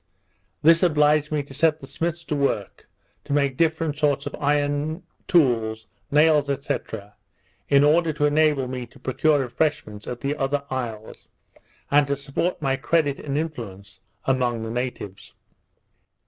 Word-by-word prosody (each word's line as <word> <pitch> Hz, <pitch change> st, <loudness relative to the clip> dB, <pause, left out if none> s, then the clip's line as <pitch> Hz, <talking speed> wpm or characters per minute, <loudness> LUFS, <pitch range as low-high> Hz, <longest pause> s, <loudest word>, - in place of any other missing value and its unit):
This 165 Hz, +2 st, +6 dB
obliged 150 Hz, -3 st, +3 dB
me 150 Hz, -1 st, 0 dB
to 140 Hz, -, -13 dB
set 155 Hz, +2 st, +2 dB
the 135 Hz, -, -10 dB
smiths 170 Hz, +4 st, -3 dB
to 150 Hz, -, -3 dB
work 125 Hz, -8 st, -2 dB, 0.3 s
to -, -, -4 dB
make 140 Hz, -2 st, +1 dB
different 160 Hz, -1 st, 0 dB
sorts 145 Hz, -2 st, +1 dB
of 145 Hz, -, -5 dB
iron 145 Hz, +3 st, 0 dB, 0.2 s
tools, 115 Hz, -9 st, +2 dB, 0.2 s
nails, 150 Hz, -1 st, +4 dB, 0.2 s
&c. 140 Hz, -, +1 dB, 0.9 s
in 140 Hz, 0 st, +5 dB
order 160 Hz, +2 st, +4 dB
to 150 Hz, 0 st, 0 dB
enable 150 Hz, -3 st, +2 dB
me 125 Hz, -1 st, -5 dB
to -, -, -19 dB
procure 145 Hz, +3 st, +2 dB
refreshments 125 Hz, -5 st, -2 dB
at 125 Hz, -, -5 dB
the 140 Hz, +1 st, -1 dB
other 140 Hz, +1 st, -1 dB
isles, 115 Hz, -4 st, -5 dB, 0.6 s
and 145 Hz, 0 st, +4 dB
to 140 Hz, -, 0 dB
support 140 Hz, +6 st, -2 dB
my 135 Hz, -1 st, +1 dB
credit 145 Hz, 0 st, +1 dB
and 140 Hz, -1 st, -3 dB
influence 105 Hz, -11 st, -6 dB, 0.3 s
among 125 Hz, -3 st, 0 dB
the 110 Hz, -, -4 dB
natives. 120 Hz, -5 st, -5 dB
145 Hz, 145 wpm, -24 LUFS, 130-155 Hz, 0.9 s, This